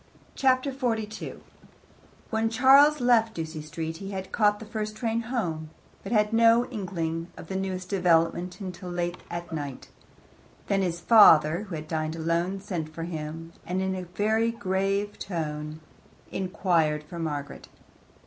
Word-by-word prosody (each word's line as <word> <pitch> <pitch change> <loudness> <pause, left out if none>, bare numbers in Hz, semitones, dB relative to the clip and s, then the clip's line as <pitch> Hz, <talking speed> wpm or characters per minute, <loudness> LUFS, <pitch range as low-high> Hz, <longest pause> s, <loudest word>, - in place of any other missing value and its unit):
Chapter 260 +1 +2
42 225 -5 -3 0.9
When 225 0 +1
Charles 275 +6 +6
left 230 -2 +3
Ducie 160 -1 -5
Street 160 +1 -5
he 195 +2 -7
had 190 -1 -5
caught 210 -2 +3
the 220 - -8
first 215 0 -4
train 225 +1 -1
home, 175 -11 -3 0.3
but - - -7
had 210 -1 +2
no 230 +1 +5
inkling 170 -6 -3
of 165 - -10
the 190 - -3
newest 190 -1 -3
development 175 -1 +2
until 185 -2 -7
late 175 0 -2
at 170 -1 -6
night. 145 -4 -5 0.8
Then 195 -1 +1
his 175 -2 -1
father, 170 -3 +6
who 185 -5 -6
had 155 0 -6
dined 155 0 -2
alone, 170 +4 -1
sent 175 -6 -4
for 165 +1 -6
him, 165 0 -6
and 180 +1 -2
in 190 -1 -2
very 220 +2 +2
grave 195 -1 -1
tones 155 -4 -4 0.5
inquired 170 -5 +1
for 170 +3 -9
Margaret. 145 -3 -4
185 Hz, 145 wpm, -27 LUFS, 165-215 Hz, 0.9 s, Charles